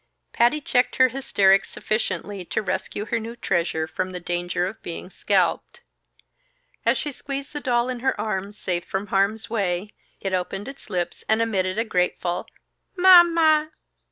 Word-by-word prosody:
Patty 240 +6 +3
checked 250 -3 +1
her 260 0 +5
hysterics 200 -7 +3
sufficiently 200 -2 -3
to - - -2
rescue 205 +2 -3
her 230 - -1
new 230 +1 -7
treasure 170 -7 0
from 185 +3 -4
the 180 - -4
danger 175 0 -1
of 195 +4 -6
being 175 +2 -7
scalped. - - 0 1.1
As - - +4
she 295 - -3
squeezed 275 +1 -6
the 295 - -3
doll 245 -3 +1
in 255 -1 -3
her 265 -3 0
arms, 205 -1 -3
safe 175 -3 -2
from 190 +2 -3
harm's 200 +3 +1
way, 200 -2 -1 0.3
it 195 -1 -3
opened 190 +3 -2
its 275 -3 -10
lips 175 -3 -3
and 220 +1 +3
emitted 195 -4 0
a 225 - +1
grateful, 180 -2 -1 0.5
"_Ma 355 -2 +8
ma! 315 -2 +4
210 Hz, 160 wpm, -24 LUFS, 185-250 Hz, 1.1 s, Ma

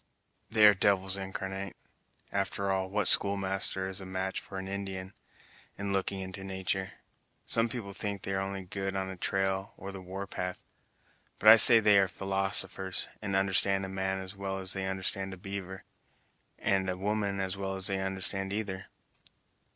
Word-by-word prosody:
"They 110 -1 +4
are 105 - +8
devils 95 -1 +2
incarnate! 95 0 -5 0.6
After 100 0 -2
all, 95 0 -2
what 105 0 0
schoolmaster 95 -1 +2
is 95 0 -3
a - - -9
match 95 0 -3
for 95 - -10
an 95 0 -6
Indian, 95 -1 -6 0.6
in 100 -1 -3
looking 95 0 -2
into 95 +1 -7
natur'! 95 0 -3 0.5
Some 115 0 +1
people 110 -4 -7
think 100 -1 -5
they 95 - -2
are 95 - -1
only 95 0 -5
good 95 0 -5
on 95 0 -3
a - - -8
trail 95 +3 -2
or 100 - -8
the 95 -1 -9
war 95 +2 -7
path, 90 -1 -6 0.7
but 110 - +5
I 110 - +11
say 115 +1 +11
that 110 - +1
they 105 -1 +5
are 95 - +2
philosophers, 95 0 +3
and 100 -3 -3
understand 95 0 +2
a - - -7
man 95 0 -2
as 95 +1 -8
well 95 0 -5
as 95 0 -4
they 95 -1 -4
understand 95 0 -2
a - - -18
beaver, 95 0 -7 0.7
and 95 -1 0
a 90 - -3
woman 100 0 -2
as 95 0 -2
well 95 0 -4
as 95 -1 -4
they 95 -1 -1
understand 95 0 -2
either. 100 -2 -5
95 Hz, 180 wpm, -29 LUFS, 95-100 Hz, 0.7 s, I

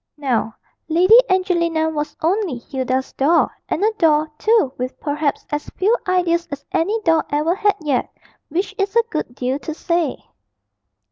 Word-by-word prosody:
Now 250 -6 -1 0.3
Lady 365 +8 +6
Angelina 340 -4 +1
was 300 -1 -3
only 355 - 0
Hilda's 260 +1 -3
doll, 315 +5 +3 0.2
and 360 - -1
a 435 - +4
doll, 310 -2 +4
too, 435 - +3
with 255 +1 -5
perhaps 295 -1 -2
as 295 0 -3
few 415 +6 +3
ideas 350 -2 +1
as 285 -1 -7
any 405 +7 +1
doll 325 -3 +3
ever 300 +4 +1
had 410 +1 +1
yet 280 -5 0 0.4
which 360 +6 -2
is 395 +2 -1
a 465 - +5
good 305 -6 -3
deal 260 +2 -2
to 315 0 -6
say. 335 -5 -1
320 Hz, 155 wpm, -20 LUFS, 285-370 Hz, 0.4 s, Lady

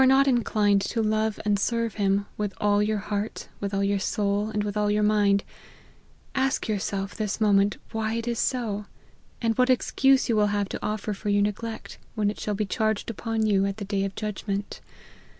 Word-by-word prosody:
not 265 +1 +5
inclined 210 -5 +3
to 225 - -2
love 215 0 +1
and 205 -1 +2
serve 230 +1 0
him, 200 -1 +1
" - - -31
with 205 -2 -3
all 205 0 +3
your 215 +1 +1
heart, 205 +1 -4
with 200 -1 -3
all 200 0 0
your 200 0 +1
soul, 205 +1 0
and 210 -1 -1
with 205 0 -3
all 210 0 +1
your 210 0 +2
mind," 205 -1 +3 0.9
ask 265 0 0
yourself 200 -2 -2
this 215 -1 -3
moment 205 -1 +3
why 220 0 -1
it 230 0 -3
is 235 -1 -1
so, 215 -5 -1 0.6
and 225 -1 +2
what 250 +1 +4
excuse 265 +1 +3
you 230 - +2
will 210 -1 +4
have 205 -1 0
to - - -6
offer 210 0 -2
for 205 +1 -4
your 205 0 +3
neglect, 220 +2 -4 0.2
when 210 -1 +1
it - - -10
shall 210 - -2
be 210 +1 -1
charged 220 +2 -1
upon 225 0 -2
you 200 -2 +3
at 200 +1 -4
the 205 - -5
day 195 0 -1
of 195 0 -3
judgment. 205 -1 -4
210 Hz, 205 wpm, -26 LUFS, 200-220 Hz, 0.9 s, not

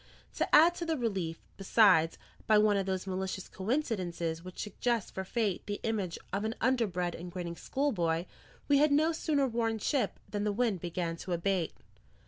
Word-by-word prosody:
To - - +3
add 335 +3 +7
to 340 - -3
the 320 -1 0
relief, 190 -9 -2
besides, 190 -5 +4 0.3
by 215 - +6
one 210 -1 +4
of 195 -1 0
those 190 -1 -2
malicious 190 0 -3
coincidences 185 - -2
which 185 0 -10
suggest 225 +1 -1
for 190 - -3
fate 205 -1 -1
the 205 0 -3
image 205 -6 -1 0.2
of 200 +1 0
an 220 +2 -2
underbred 200 -9 +1
and 175 +1 -7
grinning 175 -2 -5
schoolboy, 175 - 0 0.4
we 285 -1 +5
had 300 0 +4
no 310 +3 +4
sooner 305 -3 +1
worn 230 -2 0
ship 245 -1 -1
than 205 -1 -3
the 210 - +1
wind 210 -3 0
began 170 -1 -3
to 180 +1 -4
abate. 175 0 0
200 Hz, 175 wpm, -31 LUFS, 180-235 Hz, 0.4 s, add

